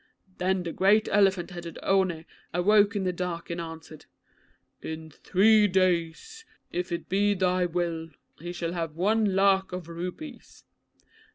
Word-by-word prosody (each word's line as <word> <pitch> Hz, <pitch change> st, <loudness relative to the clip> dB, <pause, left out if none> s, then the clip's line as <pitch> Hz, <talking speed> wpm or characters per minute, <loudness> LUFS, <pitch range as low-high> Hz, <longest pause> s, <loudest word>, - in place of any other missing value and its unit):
Then 185 Hz, 0 st, 0 dB
that 170 Hz, -, -5 dB
great 205 Hz, +3 st, +4 dB
elephant 195 Hz, -2 st, +2 dB
headed 175 Hz, -1 st, -8 dB
One 185 Hz, -4 st, +1 dB, 0.3 s
awoke 205 Hz, +3 st, +4 dB
in 200 Hz, -, -1 dB
the 180 Hz, -1 st, -1 dB
dark 175 Hz, -1 st, -4 dB
and 170 Hz, 0 st, -3 dB
answered, 160 Hz, -2 st, -10 dB, 0.7 s
"In 160 Hz, 0 st, -7 dB
three 210 Hz, +7 st, +4 dB
days, 185 Hz, -, 0 dB, 0.3 s
if 180 Hz, +1 st, -3 dB
it 170 Hz, -, -4 dB
be 205 Hz, +2 st, +2 dB
thy 180 Hz, -1 st, +1 dB
will, 170 Hz, -1 st, -3 dB, 0.3 s
he 175 Hz, +3 st, -6 dB
shall 170 Hz, -1 st, -4 dB
have 165 Hz, -3 st, -4 dB
one 205 Hz, +2 st, +1 dB
lakh 195 Hz, 0 st, +3 dB
of 180 Hz, -2 st, -6 dB
rupees." 180 Hz, -, -8 dB
180 Hz, 145 wpm, -27 LUFS, 170-195 Hz, 0.7 s, great